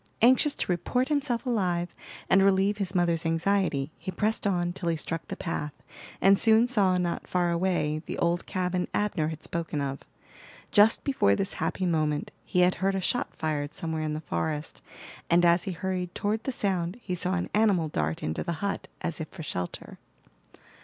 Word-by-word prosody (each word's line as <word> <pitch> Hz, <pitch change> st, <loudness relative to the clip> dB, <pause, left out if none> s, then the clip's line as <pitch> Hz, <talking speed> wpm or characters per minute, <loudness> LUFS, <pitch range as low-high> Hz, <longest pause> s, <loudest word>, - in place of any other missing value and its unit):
Anxious 260 Hz, +4 st, +5 dB
to -, -, -2 dB
report 250 Hz, +9 st, 0 dB
himself 280 Hz, -5 st, 0 dB
alive, 180 Hz, -8 st, 0 dB, 0.3 s
and 195 Hz, -, +5 dB
relieve 195 Hz, +1 st, +3 dB
his 190 Hz, -1 st, -2 dB
mother's 170 Hz, -2 st, +2 dB
anxiety, 165 Hz, -3 st, +1 dB
he -, -, -6 dB
pressed 210 Hz, +3 st, 0 dB
on 175 Hz, -2 st, 0 dB
till 175 Hz, -2 st, -2 dB
he 165 Hz, -, +1 dB
struck 160 Hz, +1 st, -4 dB
the -, -, -4 dB
path, 150 Hz, -4 st, -3 dB, 0.5 s
and 195 Hz, +1 st, +5 dB
soon 225 Hz, +1 st, +5 dB
saw, 200 Hz, -7 st, +3 dB
not 175 Hz, -1 st, -2 dB
far 175 Hz, -1 st, +1 dB
away, 170 Hz, -3 st, 0 dB
the -, -, -4 dB
old 170 Hz, +1 st, 0 dB
cabin 180 Hz, -1 st, -1 dB
Abner 205 Hz, -7 st, 0 dB
had 160 Hz, -1 st, -6 dB
spoken 165 Hz, -3 st, -3 dB
of. 140 Hz, -1 st, -2 dB, 0.7 s
Just 215 Hz, +1 st, +5 dB
before 180 Hz, -, +3 dB
this 195 Hz, -, -1 dB
happy 185 Hz, -, -1 dB
moment 155 Hz, -4 st, 0 dB
he 180 Hz, -, +1 dB
had 180 Hz, +1 st, +5 dB
heard 195 Hz, 0 st, +2 dB
a -, -, 0 dB
shot 245 Hz, +6 st, -1 dB
fired 150 Hz, -2 st, -2 dB
somewhere 160 Hz, -1 st, -3 dB
in 155 Hz, -1 st, -2 dB
the 155 Hz, -, -4 dB
forest, 155 Hz, -1 st, -3 dB, 0.5 s
and 175 Hz, +1 st, +5 dB
as 170 Hz, 0 st, +4 dB
he 195 Hz, -, -2 dB
hurried 180 Hz, 0 st, -3 dB
toward 215 Hz, +2 st, -1 dB
the 265 Hz, -, 0 dB
sound 190 Hz, -4 st, -1 dB
he 195 Hz, -6 st, -5 dB
saw 180 Hz, +1 st, 0 dB
an 180 Hz, -, -3 dB
animal 205 Hz, -6 st, +3 dB
dart 80 Hz, -, -2 dB
into 80 Hz, +1 st, -2 dB
the 170 Hz, -, -2 dB
hut, 200 Hz, +5 st, -3 dB
as 170 Hz, -2 st, -3 dB
if 155 Hz, -, -4 dB
for 170 Hz, -, -9 dB
shelter. 90 Hz, -11 st, -5 dB
180 Hz, 185 wpm, -28 LUFS, 160-200 Hz, 0.7 s, Anxious